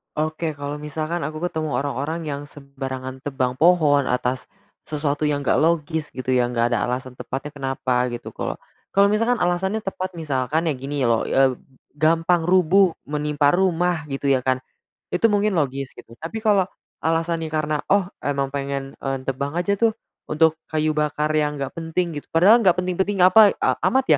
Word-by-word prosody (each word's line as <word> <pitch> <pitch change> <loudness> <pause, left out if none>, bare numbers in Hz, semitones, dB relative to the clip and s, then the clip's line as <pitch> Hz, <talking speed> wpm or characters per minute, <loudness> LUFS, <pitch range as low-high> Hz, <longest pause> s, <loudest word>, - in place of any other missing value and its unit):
Oke, 155 +1 -1
kalau 145 +1 -4
misalkan 155 +3 -3
aku 155 +2 -4
ketemu 155 -3 -3
orang-orang 145 +4 -2
yang 140 -1 -3
sembarangan 135 -2 -7
tebang 130 -4 -1
pohon 155 -3 +4
atas 125 0 -1 0.4
sesuatu 145 -1 -2
yang 150 -1 +1
enggak 140 - +1
logis 160 -1 0
gitu 130 0 -1
ya, 125 -1 +2
enggak 120 -1 +2
ada - - 0
alasan 125 +1 -3
tepatnya 135 +3 -5
kenapa 130 -2 -1
gitu, 120 0 -7
kalau - - -4 0.3
kalau 200 0 +5
misalkan 230 +4 +1
alasannya 185 +4 0
tepat 190 -2 -4
misalkan 150 +2 -1
ya 155 - +2
gini 140 +2 -4
loh, 115 -1 +2
eb 135 -1 +3 0.4
gampang 165 +3 +2
rubuh, 185 +1 +4 0.2
menimpa 150 +1 +1
rumah 180 -3 +1
gitu 135 +1 -2
ya, 130 -2 +3
kan. 130 0 +1 0.6
Itu 220 +4 +3
mungkin 205 -1 +2
logis 135 -3 -2
gitu, - - -14
tapi 170 +8 -5
kalau 200 -4 +3 0.3
alasannya 165 0 0
karena, 155 -1 -1
"Oh 195 -1 +2
emang 140 -1 -1
pengen 140 -1 -3
en 135 -1 -3
tebang 140 +3 -3
aja 195 +3 0
tuh 225 -2 +3 0.3
untuk 160 +1 +2
kayu 155 0 0
bakar 150 0 0
yang 150 -1 +1
enggak 135 -1 -3
penting." 165 -1 -2
Gitu, - - -22
padahal 200 +8 +7
enggak 185 -6 +4
penting-penting 185 +1 0
apa, 205 +3 +7
e - - 0 0.2
amat 265 +1 +2
155 Hz, 170 wpm, -22 LUFS, 135-175 Hz, 0.6 s, padahal